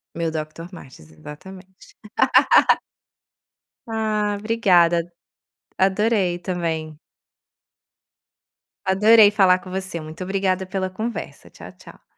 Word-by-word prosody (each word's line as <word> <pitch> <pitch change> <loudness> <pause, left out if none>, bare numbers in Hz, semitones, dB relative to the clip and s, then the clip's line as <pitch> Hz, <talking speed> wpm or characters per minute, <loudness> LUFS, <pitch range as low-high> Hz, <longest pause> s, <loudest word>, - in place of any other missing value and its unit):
Meu 165 0 -2
Doctor 155 +2 -7
Martens, 130 - -14
exatamente. 185 - -14 1.9
Ah, 215 -2 -1
obrigada. 175 -6 +2 0.7
Adorei 190 -2 +1
também. 165 -4 -4 1.9
Adorei 210 +2 +5
falar 190 -3 +3
com 185 - -12
você. 190 -2 -5
Muito 155 +3 -8
obrigada 190 0 -1
pela 185 0 -3
conversa. 220 +5 -7
Tchau, - - -13
tchau. - - -17
185 Hz, 90 wpm, -21 LUFS, 170-205 Hz, 1.9 s, Adorei